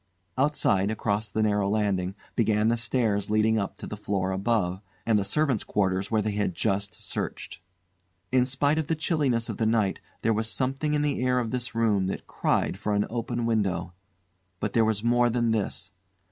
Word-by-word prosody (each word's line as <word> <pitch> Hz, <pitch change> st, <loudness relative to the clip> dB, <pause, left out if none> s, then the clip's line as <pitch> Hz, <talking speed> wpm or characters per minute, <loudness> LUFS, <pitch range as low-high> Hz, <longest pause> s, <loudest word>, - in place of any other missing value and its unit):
Outside, 115 Hz, -8 st, +2 dB
across 105 Hz, -1 st, -1 dB
the 110 Hz, +2 st, 0 dB
narrow 105 Hz, -2 st, +2 dB
landing, 100 Hz, -3 st, 0 dB, 0.2 s
began 110 Hz, -1 st, +2 dB
the 120 Hz, -, +3 dB
stairs 110 Hz, -3 st, 0 dB
leading 110 Hz, +1 st, +3 dB
up 100 Hz, -, -3 dB
to -, -, -8 dB
the -, -, -5 dB
floor 95 Hz, -2 st, -1 dB
above, 95 Hz, -2 st, 0 dB, 0.2 s
and 110 Hz, -2 st, +3 dB
the -, -, 0 dB
servants' 130 Hz, +3 st, +1 dB
quarters 95 Hz, -1 st, 0 dB
where 110 Hz, -2 st, +1 dB
they 110 Hz, -, 0 dB
had 100 Hz, -4 st, -1 dB
just 100 Hz, -1 st, -1 dB
searched. -, -, -4 dB, 0.7 s
In 130 Hz, -1 st, +4 dB
spite 145 Hz, +4 st, +1 dB
of 155 Hz, -, -2 dB
the 165 Hz, -, +1 dB
chilliness 145 Hz, -8 st, 0 dB
of -, -, -4 dB
the 110 Hz, -, +1 dB
night 110 Hz, -4 st, +1 dB, 0.2 s
there 115 Hz, -, +3 dB
was 110 Hz, +1 st, -1 dB
something 135 Hz, +5 st, 0 dB
in 150 Hz, -, +1 dB
the 145 Hz, -4 st, 0 dB
air 125 Hz, 0 st, +2 dB
of 120 Hz, -3 st, -1 dB
this 125 Hz, -2 st, -3 dB
room 105 Hz, -5 st, +2 dB
that 95 Hz, -, -4 dB
cried 95 Hz, -, 0 dB
for 105 Hz, -1 st, 0 dB
an 105 Hz, -, +2 dB
open 120 Hz, 0 st, -2 dB
window. 95 Hz, -6 st, 0 dB, 0.7 s
But 105 Hz, -, -2 dB
there 115 Hz, -1 st, +4 dB
was 110 Hz, -1 st, 0 dB
more 120 Hz, +1 st, +3 dB
than 120 Hz, -1 st, +1 dB
this. 110 Hz, -3 st, -2 dB
110 Hz, 190 wpm, -27 LUFS, 100-120 Hz, 0.7 s, In